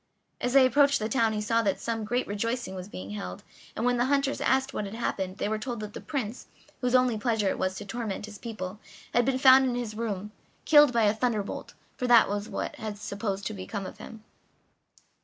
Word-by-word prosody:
As 245 - 0
they 270 -1 +7
approached 280 +2 +4
the 215 - -2
town 230 -2 +2
he 210 - -2
saw 230 +2 +2
that 200 -3 0
some 225 -2 -3
great 245 +4 0
rejoicing 230 +1 -2
was 185 +1 -7
being 95 - -7
held, 90 -3 -6 0.3
and 225 - -2
when 245 0 +2
the 240 - +2
hunters 275 0 +1
asked 265 +1 +1
what 210 - -2
had 200 +2 -7
happened 190 -5 -3
they - - -1
were 215 0 -1
told 240 +1 -4
that 210 -1 -7
the - - -7
Prince, 250 -5 -4 0.3
whose 250 0 +1
only 250 -3 +3
pleasure 220 -3 +1
it - - -2
was 185 0 0
to 205 - -7
torment 210 -1 -4
his 210 -1 -11
people, 205 -4 -6 0.3
had 240 0 +3
been 265 0 +1
found 265 0 +7
in 250 -2 0
his 240 -3 -3
room, 210 -2 -4 0.3
killed 295 -3 +7
by 235 -2 +2
a 205 0 +4
thunder 220 -2 0
bolt - - -7 0.2
(for 250 - -1
that 240 -2 +7
was 205 +1 -3
what - - -3
was 215 -2 -5
supposed 200 -1 -4
to 220 - -2
have - - -8
become 195 +1 -5
of - - -9
him). 220 -1 -10
225 Hz, 230 wpm, -28 LUFS, 205-245 Hz, 0.3 s, they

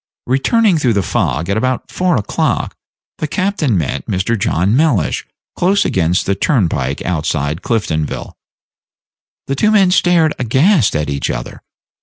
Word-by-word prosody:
Returning 175 - +2
through 125 -5 +2
the 100 -2 0
fog 85 -1 -1
at 100 +2 0
about 130 +2 -2
four 180 -1 +1
o'clock, 105 - -1 0.4
the 155 - -2
captain 155 - 0
met 80 -6 -2
Mr. 95 +5 0
John 100 0 0
Mellish 140 - +1 0.3
close 190 +3 +2
against 90 -1 +1
the 100 - +1
turnpike 85 - 0
outside 80 -2 -2
Cliftonville. 80 -10 -2 1.1
The 135 - -2
two 215 - +2
men 200 -4 +4
stared 175 -4 +3
aghast 135 - +2
at 75 -1 -1
each 70 -1 -2
other. - - -5
115 Hz, 140 wpm, -16 LUFS, -, 1.1 s, men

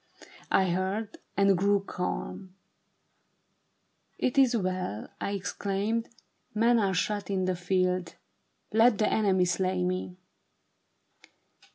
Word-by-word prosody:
I 190 -2 +3
heard, 195 +4 -2 0.2
and 200 -1 +5
grew 200 +2 +2
calm. 185 0 -5 0.7
* - - -9
It 250 - -3
is 255 -3 +4
well,' 185 - -3
I 200 - -2
exclaimed. 200 +3 -2 0.3
' - - -46
Men 230 +2 +4
are 195 -3 +1
shot 205 +1 -1
in 190 -2 0
the 185 0 0
field: 180 0 0 0.6
Let 225 0 +5
the 215 - +2
enemy 190 -4 +3
slay 185 0 0
me.' 180 0 -2
195 Hz, 115 wpm, -28 LUFS, 185-210 Hz, 0.7 s, and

